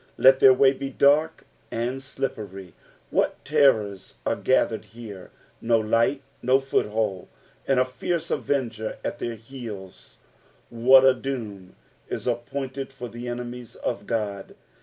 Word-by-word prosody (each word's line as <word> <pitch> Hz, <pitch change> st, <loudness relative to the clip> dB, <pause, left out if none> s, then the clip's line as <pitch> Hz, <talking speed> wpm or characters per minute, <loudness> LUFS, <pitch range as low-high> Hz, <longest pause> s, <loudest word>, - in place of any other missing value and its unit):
Let 130 Hz, 0 st, +6 dB
their 130 Hz, -1 st, +8 dB
uay 135 Hz, +1 st, +3 dB
he 135 Hz, -, -2 dB
dark 145 Hz, +4 st, +3 dB, 0.2 s
and 120 Hz, +3 st, -2 dB
tlippery.^' 110 Hz, -9 st, -5 dB, 0.4 s
What -, -, 0 dB
terrors 115 Hz, -10 st, +2 dB
are -, -, +1 dB
gathered -, -, +1 dB
here! 110 Hz, -5 st, -10 dB, 0.3 s
No 115 Hz, 0 st, +3 dB
light, 115 Hz, +5 st, +1 dB, 0.2 s
no 130 Hz, +2 st, +4 dB
foothold, 105 Hz, -7 st, -1 dB, 0.4 s
and 135 Hz, -2 st, +3 dB
a -, -, +5 dB
fierie 160 Hz, +7 st, -3 dB
avenger 120 Hz, -5 st, -2 dB
at -, -, -3 dB
their 120 Hz, -1 st, -3 dB
heels 110 Hz, -5 st, -10 dB, 0.5 s
I -, -, -14 dB
'(Vhat 130 Hz, +3 st, +7 dB
a 130 Hz, -, +7 dB
doom 115 Hz, -8 st, -6 dB, 0.4 s
i» -, -, 0 dB
appointed 130 Hz, +3 st, -4 dB
for 125 Hz, -3 st, -7 dB
the 120 Hz, +1 st, -7 dB
enemies 120 Hz, 0 st, -6 dB
of -, -, -4 dB
God 100 Hz, -4 st, -3 dB
120 Hz, 140 wpm, -25 LUFS, 110-135 Hz, 0.5 s, their